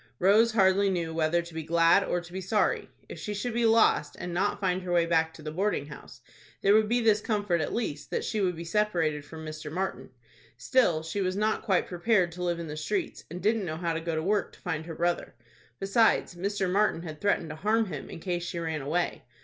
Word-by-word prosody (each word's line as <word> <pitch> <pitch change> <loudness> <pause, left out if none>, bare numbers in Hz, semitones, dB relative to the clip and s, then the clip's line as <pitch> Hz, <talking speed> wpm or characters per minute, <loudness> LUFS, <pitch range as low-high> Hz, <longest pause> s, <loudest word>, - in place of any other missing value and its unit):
Rose 215 +5 +4
hardly 195 -1 +4
knew 170 -3 -2
whether 165 +1 +1
to 170 -1 -12
be 160 - -3
glad 170 +4 +4
or 175 - -1
to 175 0 -13
be 190 - -4
sorry. 205 +3 0 0.2
If - - -9
she 210 - -4
should 235 +4 -3
be 235 0 +2
lost, 225 0 +3
and 175 0 -5
not 195 +4 0
find 185 -2 0
her 180 -1 -5
way 170 -1 +3
back 165 -1 +2
to 155 - -12
the 155 - -4
boarding 190 -3 -1
house, 150 - -12 0.4
there 200 - +5
would 215 0 +4
be 240 +1 +2
this 215 -2 +3
comfort 205 -7 0
at 150 - -2
least, 145 -11 -3
that - - -2
she 215 - -1
would 180 -2 +1
be 165 - -6
separated 165 -6 0
from 160 +2 -10
Mr. 155 -1 -7
Martin. 190 +4 -3 0.5
Still 175 -12 +2
she 165 +5 -3
was 185 0 0
not 215 +2 0
quite 190 -3 +1
prepared 180 0 +1
to 180 +2 -6
live 175 -1 0
in 170 - -4
the 150 -1 -6
streets, 345 - -3
and 175 +2 -7
didn't 215 0 +2
know 160 -3 -4
how 170 -1 -1
to 160 - -3
go 165 -1 -2
to 160 - -1
work 205 +2 0
to - - -17
find 160 -2 -3
her 165 - -6
brother. 175 +1 -1 0.4
Besides, 200 0 +2
Mr. 195 +2 -2
Martin 190 -2 +1
had 155 -3 -8
threatened 185 -6 +1
to - - -6
harm 220 +6 +2
him 150 -8 -7
in - - -8
case 175 0 -2
she 175 0 -5
ran 160 -2 -2
away. 165 +6 -1
180 Hz, 240 wpm, -28 LUFS, 165-205 Hz, 0.5 s, there